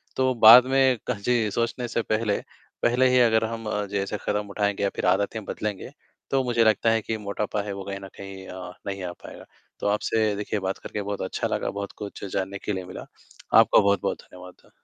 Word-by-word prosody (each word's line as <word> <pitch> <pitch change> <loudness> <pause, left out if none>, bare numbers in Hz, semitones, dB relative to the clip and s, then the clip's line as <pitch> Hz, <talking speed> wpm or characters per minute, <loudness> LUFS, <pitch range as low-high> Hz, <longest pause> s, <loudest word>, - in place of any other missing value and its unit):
तो 130 -1 +2
बाद 120 +3 +11
में 130 -1 +3
क - - 0
जी, 115 0 +1
सोचने 120 +3 -2
से 115 - -1
पहले 110 -2 0 0.4
पहले 125 +2 +4
ही 125 - +4
अगर 115 -2 +4
हम 115 0 -5 0.3
जैसे 100 +1 -2
कदम 105 0 -1
उठाएँगे 100 0 -1
या 100 - +2
फिर - - -2
आदतें 100 +4 +1
बदलेंगे, 105 -2 -4 0.4
तो 135 -1 +2
मुझे 120 -2 +2
लगता 110 +1 +3
है 115 0 +2
कि 110 +1 -3
मोटापा 105 0 -3
है, 100 -1 -5
वो 100 0 -6
कहीं 100 0 -5
न - - -7
कहीं 95 -1 -9
अ, 90 -1 -8 0.2
नहीं 100 -1 -4
आ 90 - -4
पाएगा। - - -11 0.3
तो - - -2
आपसे 105 +1 +1
देखिए, 105 +1 -3
बात 95 0 -3
करके 105 - -6
बहुत 100 0 -4
अच्छा 95 - -2
लगा, - - -2
बहुत 100 0 -5
कुछ 105 -2 -8
जानने 95 0 -2
के 105 - -1
लिए 95 -1 -4
मिला, 90 - -9 0.5
आपका - - +7
बहुत-बहुत 100 0 +1
धन्यवाद। 90 0 -15
105 Hz, 205 wpm, -25 LUFS, 100-115 Hz, 0.5 s, बाद